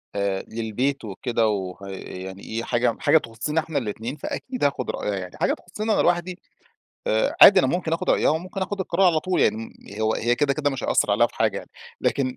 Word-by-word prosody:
آآ، 100 -1 -1
للبيت 115 +5 -2
وكده 115 +3 -1
وه 100 -1 -3
يعني 95 0 -8
إيه، 115 +1 -4
حاجة 120 -1 +1
حاجة - - +5
تخصنا 125 +5 -2
إحنا 160 -1 -4
الاتنين، 115 +3 -5
فأكيد 255 - -5
هاخد 140 - 0
رأيها 105 -1 -3
يعني. 90 -2 -7
حاجة - - +1
تخصني 215 +1 -3
أنا - - +3
لوحدي، 175 +1 0 0.7
آآ 110 0 +1
عادي 195 - +10
أنا - - +2
ممكن 165 0 -1
أخد 165 - 0
رأيها - - +3
وممكن 185 +5 -3
أخد 200 +1 -3
القرار 190 0 +2
على 160 -3 +3
طول، 185 +2 0
يعني 115 +1 0 0.3
هو 110 0 +2
هي 120 +2 +1
كده، 140 +1 +1
كده 145 -1 0
مش 135 - -5
هيأثر - - +2
عليها 115 +4 +4
في - - -18
حاجة 105 -3 +1
يعني. - - -8 0.3
لكن 130 -2 0
120 Hz, 205 wpm, -24 LUFS, 110-160 Hz, 0.7 s, عادي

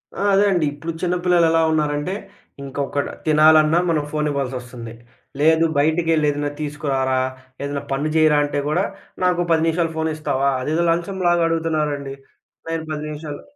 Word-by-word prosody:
ఆ! - - -5
అదే 195 +1 +5
అండి. 175 -4 +2
ఇప్పుడు 160 +3 -5
చిన్న 180 0 0
పిల్లలెలా 165 -2 +3
ఉన్నారంటే, 150 +2 0 0.5
ఇంకొకడు 140 +1 -3
తినాలన్నా 155 +1 +5
మనం 155 -3 +1
ఫోను 150 -1 -1
ఇవ్వాల్సొస్తుంది. 125 -4 -5 0.5
లేదు 160 +2 +4
బయటికెళ్ళి 160 +1 +2
ఏదనా 145 0 -1
తీసుకురారా 140 -3 -1 0.4
ఏదనా 140 0 -3
పని 140 +3 0
జేయరంటే, 150 -2 +3
గూడా 175 +6 +1 0.4
నాకో 175 -1 +2
10 160 -1 +3
నిమిషాలు 165 0 0
ఫోను 160 0 0
ఇస్తావా? 140 -2 0
అదేదో 160 +5 0
లంచం 175 +3 -2
లాగా 175 -1 +3
అడుగుతున్నారండి. 150 -4 -1 0.5
నేను 165 -1 -2
10 150 0 -4
నిమిషాలు 150 -1 -7
155 Hz, 140 wpm, -21 LUFS, 145-165 Hz, 0.5 s, అదే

